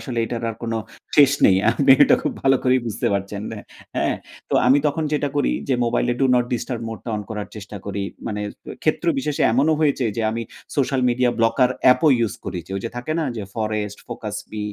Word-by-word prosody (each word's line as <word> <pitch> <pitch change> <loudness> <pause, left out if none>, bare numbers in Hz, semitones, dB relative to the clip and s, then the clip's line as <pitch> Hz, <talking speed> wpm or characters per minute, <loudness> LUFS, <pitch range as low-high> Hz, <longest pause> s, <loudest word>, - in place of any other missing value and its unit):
আসলে 125 -4 -4
এটার 120 +1 -4
আর 110 - -9
কোন 115 -1 -2 0.4
শেষ 140 -2 +8 0.2
নেই 95 - +5
আপনি 135 +3 +2
এটা - - +5
খুব - - -1
ভালো 135 0 +4
করেই 130 0 +4
বুঝতে 110 - -2
পারছেন 100 +1 -3
অ্যা 105 - -7 0.3
হ্যাঁ, - - +1 0.3
তো - - +1
আমি 135 +3 +6
তখন 155 +2 0
যেটা 145 -1 +1
করি 145 - +2 0.2
যে, 130 - +3
মোবাইলে 120 +1 +1
ডু 135 - +4
নট 125 - +3
ডিস্টার্ব 120 0 -3
মোডটা 115 +2 -7
অন 105 - -4
করার 105 -2 -4
চেষ্টা 105 0 -8
করি। 100 0 -3 0.2
মানে 105 -2 -3
অ্যা 105 - -9
ক্ষেত্রবিশেষে 150 -2 0
এমনও 145 +6 +3
হয়েছে 145 -4 +2
যে, 115 - -1
আমি 115 +1 -3 0.3
সোশ্যাল 135 -1 +1
মিডিয়া 125 0 +2
ব্লকার 115 +3 +3
অ্যাপও 130 +5 +6
ইউস 115 -5 0
করে। 90 -1 -4
যে, - - -16
ওই - - -3
যে, 115 - -3
থাকে 125 +6 -3
না - - 0
যে, 110 - -4
'Forest', 105 -2 -3
'Focus - - -5
B', 105 -1 -4
120 Hz, 210 wpm, -22 LUFS, 105-135 Hz, 0.4 s, শেষ